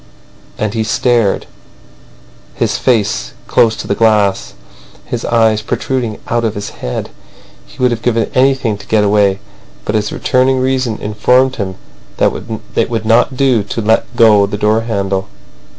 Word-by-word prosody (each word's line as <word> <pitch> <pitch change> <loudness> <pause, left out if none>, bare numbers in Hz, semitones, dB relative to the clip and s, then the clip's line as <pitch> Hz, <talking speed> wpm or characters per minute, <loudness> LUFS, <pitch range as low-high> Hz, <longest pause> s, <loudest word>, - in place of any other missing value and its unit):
And 105 -1 -2
he 110 - 0
stared, 115 -1 +1 1.1
his - - 0
face 105 - 0
close 110 -2 +3
to - - -7
the - - +1
glass, 105 -3 +1 0.5
his 120 - -4
eyes 110 -2 +2
protruding 120 0 -2
out 120 0 0
of 110 -2 -1
his 105 0 -5
head. 60 - -5 0.6
He - - -17
would 125 -1 +2
have 115 -1 -3
given 115 -1 0
anything 130 -5 +2
to 100 - -13
get 110 -1 +2
away, 100 -1 +3 0.5
but - - -2
his 105 -1 0
returning 130 +1 +1
reason 130 -3 0
informed 125 +5 +1
him 95 -3 -3 0.4
that - - +3 0.4
it - - +1
would 115 -2 -3
not 120 +3 +2
do 130 -5 +3
to 100 +3 -5
let 110 +3 0
go 105 -4 +5
the 105 - -4
door 105 +2 +2
handle. 100 -4 -2
110 Hz, 155 wpm, -14 LUFS, 105-120 Hz, 1.1 s, go